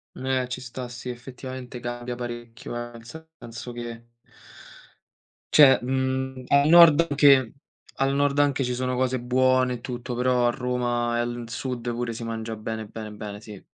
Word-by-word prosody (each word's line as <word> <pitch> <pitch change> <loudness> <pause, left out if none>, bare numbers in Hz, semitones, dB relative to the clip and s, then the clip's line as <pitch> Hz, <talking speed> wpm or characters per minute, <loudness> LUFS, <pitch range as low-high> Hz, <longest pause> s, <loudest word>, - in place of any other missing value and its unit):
Mh, 130 - -7 0.2
eh, 125 - -4
ci 130 - -4
sta 125 0 -7
sì, 120 +1 -9
effettivamente 125 0 -8
cambia 120 0 -5
parecchio, 120 -1 -7
eh, 120 0 -5
nel 115 0 -13 0.4
senso 120 +1 -8
che 120 -1 -8 1.5
cioè, 135 -4 +8
mhmm, 130 0 -2
al 140 +2 +4
Nord 170 -1 +8
anche 140 -4 +5 0.4
al 135 0 +1
Nord 145 0 +1
anche 140 -2 +2
ci 125 - -1
sono 125 +1 -2
cose 130 0 0
buone 130 +1 +2
e 115 - -10
tutto, 120 0 -5
però 125 0 +2
a - - +4
Roma 120 -1 -1
e - - 0
al 120 0 -3
Sud 120 0 -4
pure 120 0 -3
si 115 - -7
mangia 115 -1 -4
bene, 110 0 -5
bene, 110 0 -8
bene, 105 0 -8
sì. 105 -3 -11
125 Hz, 170 wpm, -25 LUFS, 120-130 Hz, 1.5 s, cioè